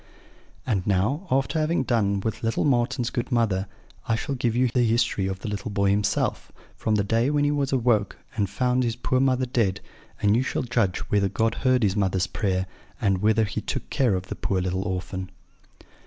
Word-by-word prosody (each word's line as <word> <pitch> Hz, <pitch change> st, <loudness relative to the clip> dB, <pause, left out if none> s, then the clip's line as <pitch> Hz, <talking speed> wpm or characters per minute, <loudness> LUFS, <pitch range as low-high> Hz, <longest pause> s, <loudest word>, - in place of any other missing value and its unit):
"And 100 Hz, -6 st, -1 dB
now, 110 Hz, -, +1 dB
after 135 Hz, +4 st, +1 dB
having 155 Hz, -2 st, +1 dB
done 100 Hz, -6 st, +1 dB
with 110 Hz, +1 st, -3 dB
little 115 Hz, 0 st, 0 dB
Marten's 125 Hz, -2 st, +1 dB
good 120 Hz, +2 st, -3 dB
mother, 105 Hz, -5 st, +1 dB, 0.4 s
I 115 Hz, -, +2 dB
shall 125 Hz, +4 st, -3 dB
give 120 Hz, -3 st, 0 dB
you 125 Hz, +1 st, +3 dB
the 125 Hz, +1 st, +1 dB
history 115 Hz, -4 st, +1 dB
of 95 Hz, -1 st, -3 dB
the -, -, -5 dB
little 105 Hz, +3 st, -4 dB
boy 100 Hz, -1 st, +1 dB
himself, 100 Hz, 0 st, 0 dB, 0.2 s
from 110 Hz, -, 0 dB
the 100 Hz, -, +2 dB
day 115 Hz, +5 st, +1 dB
when 145 Hz, 0 st, +2 dB
he 145 Hz, -, +2 dB
was 140 Hz, -2 st, 0 dB
awoke 120 Hz, -6 st, +1 dB, 0.2 s
and 100 Hz, -4 st, 0 dB
found 125 Hz, +5 st, +1 dB
his 115 Hz, -1 st, -1 dB
poor 130 Hz, +1 st, 0 dB
mother 130 Hz, -1 st, +2 dB
dead; 115 Hz, -6 st, 0 dB, 0.4 s
and 105 Hz, +1 st, +3 dB
you 120 Hz, -, +3 dB
shall 130 Hz, -, -2 dB
judge 115 Hz, -6 st, 0 dB
whether 100 Hz, -1 st, +3 dB
God 115 Hz, +3 st, +1 dB
heard 130 Hz, -1 st, +2 dB
his 100 Hz, -2 st, +2 dB
mother's 95 Hz, -3 st, +1 dB
prayer, 95 Hz, 0 st, -1 dB, 0.3 s
and 95 Hz, -2 st, +1 dB
whether 110 Hz, +2 st, +3 dB
He 100 Hz, -, -3 dB
took -, -, -5 dB
care 120 Hz, -7 st, +2 dB
of 90 Hz, 0 st, -3 dB
the -, -, -6 dB
poor 95 Hz, -, -1 dB
little 95 Hz, +2 st, -2 dB
orphan. 95 Hz, 0 st, -4 dB
110 Hz, 200 wpm, -25 LUFS, 100-125 Hz, 0.4 s, you